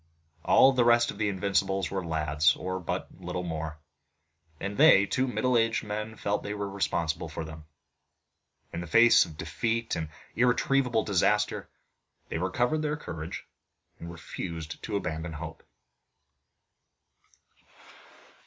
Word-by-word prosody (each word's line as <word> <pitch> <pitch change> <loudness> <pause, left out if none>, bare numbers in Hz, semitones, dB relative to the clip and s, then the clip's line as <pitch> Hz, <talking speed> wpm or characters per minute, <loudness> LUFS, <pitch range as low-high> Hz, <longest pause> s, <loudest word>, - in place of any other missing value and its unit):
All 135 - +6
the 125 -2 +3
rest 120 0 +4
of 100 - -12
the 105 -1 +1
Invincibles 95 -1 0
were 95 -1 -2
lads, 75 -3 +2
or 95 0 -4
but 90 - -3
little 90 - -4
more, 80 -2 -4 0.8
and 100 +1 -4
they 100 0 +7
two 130 +6 0
middle 125 0 0
aged 115 0 +2
men 105 +1 -4
felt 105 -1 -1
that - - -6
they 105 - -3
were 100 -1 -3
responsible 85 -5 -2
for 80 +1 -5
them. 80 -1 -10 1.1
In 85 - -3
the 85 - -7
face 115 +6 +6
of 80 -3 -12
defeat 115 +4 -2
and 80 -1 -4 0.3
irretrievable 125 -1 +2
disaster 105 +1 +1 0.6
they 80 - -3
recovered 120 - 0
their 150 -1 -1
courage, 80 - -7 0.5
and 85 +1 -7
refused 80 0 -7
to 105 - -4
abandon 80 -3 -3
hope. 80 +1 -7
100 Hz, 135 wpm, -28 LUFS, 80-115 Hz, 1.1 s, they